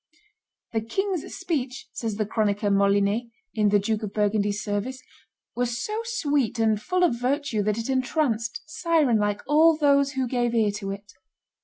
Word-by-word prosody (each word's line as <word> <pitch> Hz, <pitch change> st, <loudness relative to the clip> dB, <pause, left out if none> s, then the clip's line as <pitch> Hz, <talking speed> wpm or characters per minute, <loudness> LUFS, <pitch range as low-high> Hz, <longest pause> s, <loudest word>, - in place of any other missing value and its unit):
"The 225 Hz, -, +1 dB
king's 370 Hz, -, -2 dB
speech," 270 Hz, -6 st, -3 dB
says 225 Hz, -3 st, -3 dB
the 215 Hz, 0 st, -1 dB
chronicler 205 Hz, -1 st, 0 dB
Molinet, 200 Hz, +3 st, +2 dB, 0.3 s
in 210 Hz, -2 st, +2 dB
the 205 Hz, -, +4 dB
Duke 215 Hz, +2 st, -1 dB
of 210 Hz, -2 st, -6 dB
Burgundy's 205 Hz, -1 st, +1 dB
service, 210 Hz, +5 st, -3 dB, 0.6 s
"was 245 Hz, -1 st, -1 dB
so 430 Hz, -, -3 dB
sweet 290 Hz, -, 0 dB
and 220 Hz, -2 st, +2 dB
full 365 Hz, +5 st, 0 dB
of 240 Hz, -10 st, +2 dB
virtue 265 Hz, -3 st, 0 dB
that 210 Hz, +1 st, 0 dB
it 230 Hz, -, -3 dB
entranced, 255 Hz, -3 st, 0 dB
siren 315 Hz, -7 st, +2 dB
like, 205 Hz, 0 st, 0 dB
all 315 Hz, +2 st, +5 dB
those 280 Hz, -2 st, +3 dB
who 260 Hz, -1 st, -1 dB
gave 240 Hz, -1 st, 0 dB
ear 215 Hz, -3 st, +3 dB
to 200 Hz, -1 st, -5 dB
it." 200 Hz, +1 st, -7 dB
230 Hz, 165 wpm, -25 LUFS, 210-280 Hz, 0.6 s, all